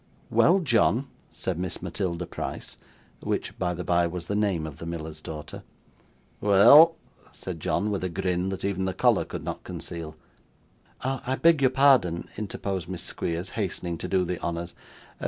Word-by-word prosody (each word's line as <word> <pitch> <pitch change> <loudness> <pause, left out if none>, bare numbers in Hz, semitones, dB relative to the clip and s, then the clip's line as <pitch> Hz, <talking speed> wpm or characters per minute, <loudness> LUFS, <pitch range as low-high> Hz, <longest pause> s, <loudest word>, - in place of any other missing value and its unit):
'Well, 185 +3 +5
John,' 120 - +3 0.3
said - - -3
Miss 90 -2 -3
Matilda 90 -3 -3
Price - - -6 0.4
(which, - - -3
by 90 -1 0
the 90 - -5
bye, 85 0 +2
was 85 0 -5
the 100 - -2
name 100 -6 0
of 75 -3 -8
the 85 - -7
miller's 80 -2 -6
daughter). 75 -1 -7 0.8
'Weel,' 140 +12 +8 0.4
said 90 -3 -7
John 105 +6 0
with 100 -2 -2
a 90 - -1
grin 90 0 -1
that 95 0 -4
even 95 -1 -1
the 95 - -2
collar - - +3
could - - -6
not - - -5
conceal. 80 -2 -6 0.9
'I 130 0 -2
beg 165 -3 +6
your 130 - +5
pardon,' 130 -11 +3
interposed 95 -4 -4
Miss 90 -2 -4
Squeers, 85 +3 -3
hastening 90 -5 -3
to - - -4
do 95 -1 +1
the 90 0 -4
honours. 85 0 -3
90 Hz, 165 wpm, -26 LUFS, 85-105 Hz, 0.9 s, Weel